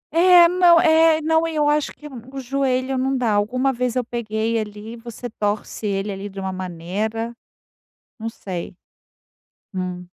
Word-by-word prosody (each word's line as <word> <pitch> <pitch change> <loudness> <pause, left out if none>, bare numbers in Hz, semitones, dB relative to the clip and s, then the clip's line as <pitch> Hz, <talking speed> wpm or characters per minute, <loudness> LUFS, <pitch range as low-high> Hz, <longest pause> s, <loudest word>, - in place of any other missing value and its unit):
É, 350 0 +7
não 350 -1 +5
é 320 -1 +5
não, 320 +1 +2
e 325 - -5
eu 295 -1 +2
acho 295 0 +1
que 300 - -12 0.2
o 275 - -6
joelho 260 0 -1
não 265 0 0
dá, 235 -4 +1
alguma 255 +6 +1
vez 245 0 -2
eu 255 - +1
peguei 225 -1 -2
ali, 210 +1 -7
você 235 +1 -8
torce 210 -1 -3
ele 200 +1 -1
ali 195 +1 -6
de 195 - -9
uma 190 0 -3
maneira, 190 +6 -4 0.8
não 225 - -4
sei. 185 -6 -6 1.0
Hum. 180 -1 -4
235 Hz, 160 wpm, -22 LUFS, 205-275 Hz, 1.0 s, É